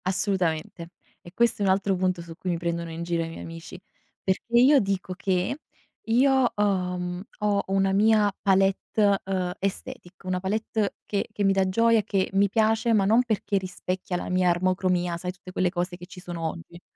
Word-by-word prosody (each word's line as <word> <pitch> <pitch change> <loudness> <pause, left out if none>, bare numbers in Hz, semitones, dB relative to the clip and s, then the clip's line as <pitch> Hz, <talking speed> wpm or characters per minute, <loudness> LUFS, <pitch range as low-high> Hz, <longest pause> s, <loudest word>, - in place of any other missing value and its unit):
Assolutamente. 180 -3 -1 0.3
E 175 - -13
questo 235 0 +1
è - - +2
un 190 - +4
altro 195 0 +1
punto 185 -1 0
su 170 -1 -9
cui 185 - -5
mi 175 - 0
prendono 170 0 -3
in 165 +1 -5
giro 170 -1 -1
i 165 - -5
miei 165 - -9
amici, 165 +1 -9 0.4
perché 190 +5 -2
io 270 +4 +7
dico 195 -3 -2
che, 185 +8 -1 0.5
io 255 +2 +3
ho, 190 -3 0
mhmm, 180 0 -4 0.2
ho 205 -2 +1
una 195 0 +1
mia 210 0 +4
palette, 195 +1 +2
ehm, 185 -2 -2
aesthetic, 195 -1 -5
una 185 -1 -1
palette 210 +2 -1
che 200 -1 -2
che 205 - -3
mi 195 0 +4
dà 190 -1 +1
gioia, 230 +3 +3
che 195 -2 -1
mi 200 +1 +3
piace, 220 +2 +2
ma 200 -3 +3
non 225 +5 +5
perché 215 -3 -1
rispecchia 185 -1 -4
la - - -5
mia 180 0 +2
armocromia, 180 -1 +1
sai 180 +1 -4
tutte 185 0 -13
quelle 185 0 +1
cose 175 0 -3
che 175 0 -11
ci 185 - -11
sono 175 -2 -7
oggi. 170 +1 -10
190 Hz, 190 wpm, -26 LUFS, 180-205 Hz, 0.5 s, io